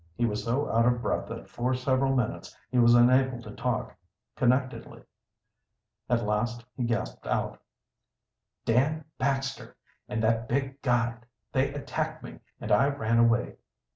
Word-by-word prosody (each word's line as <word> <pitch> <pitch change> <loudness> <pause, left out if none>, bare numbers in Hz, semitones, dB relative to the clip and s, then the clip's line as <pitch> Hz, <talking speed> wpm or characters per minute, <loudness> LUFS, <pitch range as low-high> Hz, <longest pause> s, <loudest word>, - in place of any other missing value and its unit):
He 120 - +1
was 105 -2 -2
so 125 +5 0
out 115 +1 +3
of 120 0 +2
breath - - -1
that - - -7
for 125 +2 -1
several 130 +1 +1
minutes 125 -4 -2
he 125 - +2
was 120 0 +6
unable 130 +1 +4
to 105 - -9
talk - - -2 0.4
connectedly. 130 +1 0 1.1
At 120 -2 +1
last 115 +3 -1
he 125 - -1
gasped 115 0 -3
out: - - -1 1.0
"Dan 140 +7 +2
Baxter 135 +1 -2 0.3
and 110 +1 -2
that 115 +1 +1
big 135 +1 -1
guide 120 -2 0 0.2
they 135 +1 +1
attacked 145 0 -4
me - - -9 0.2
and - - -5
I 115 +7 +5
ran 115 -5 +1
away. 115 +1 +2
120 Hz, 145 wpm, -28 LUFS, 115-135 Hz, 1.1 s, was